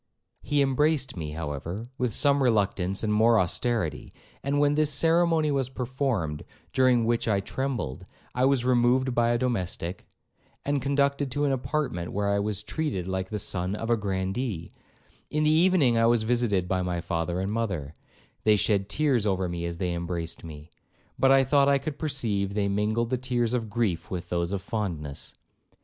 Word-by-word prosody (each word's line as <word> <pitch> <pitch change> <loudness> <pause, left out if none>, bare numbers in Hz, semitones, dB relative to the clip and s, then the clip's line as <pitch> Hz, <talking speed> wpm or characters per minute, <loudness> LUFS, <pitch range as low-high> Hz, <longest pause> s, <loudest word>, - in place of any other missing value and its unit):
He 145 -1 +2
embraced 140 0 +1
me, 75 -4 -5
however, 80 - -5
with 125 -2 0
some 140 +5 +3
reluctance 100 -5 +1
and 105 -1 +1
more 110 +1 +5
austerity; 105 0 -1 0.3
and 140 +1 0
when 145 0 +3
this 150 0 +2
ceremony 165 +1 +2
was 135 -2 0
performed, 125 - -2 0.3
during 125 -3 +4
which 115 0 0
I 100 -3 +2
trembled, 115 - -4 0.3
I 125 +1 +2
was 135 -2 +2
removed 125 +1 +3
by 120 -1 +2
a 120 - +2
domestic, 95 -7 -3 0.6
and 145 -1 0
conducted 140 0 +1
to 145 +3 -1
an 140 - +2
apartment 130 - -2
where 100 0 0
I 100 0 +2
was 105 0 -2
treated 120 - -3
like 95 0 -3
the 105 - -3
son 95 -1 -1
of 115 +2 -3
a - - +5
grandee; 95 -1 -3 0.6
in 150 0 0
the 155 - +4
evening 160 -8 +4
I 115 - +4
was 120 -1 +3
visited 110 -6 +1
by 95 0 0
my 90 -1 -2
father 85 +1 -2
and 95 +2 -2
mother; 95 -11 -2 0.5
they 110 -1 +5
shed 100 -1 +1
tears 135 -7 +1
over 95 -2 0
me 85 0 -3
as 85 0 -5
they 90 -1 -1
embraced 85 -1 -4
me, 80 0 -10 0.5
but 135 - +5
I 135 0 +6
thought 140 +1 +3
I 140 - +4
could 140 +1 -5
perceive 110 -10 -1
they 100 -1 +1
mingled 110 +4 0
the 130 - 0
tears 120 -2 0
of 115 -3 -1
grief 100 -8 -1
with 90 -1 -5
those 85 0 -1
of 100 -2 -3
fondness. 85 -10 -4
115 Hz, 180 wpm, -27 LUFS, 95-135 Hz, 0.6 s, I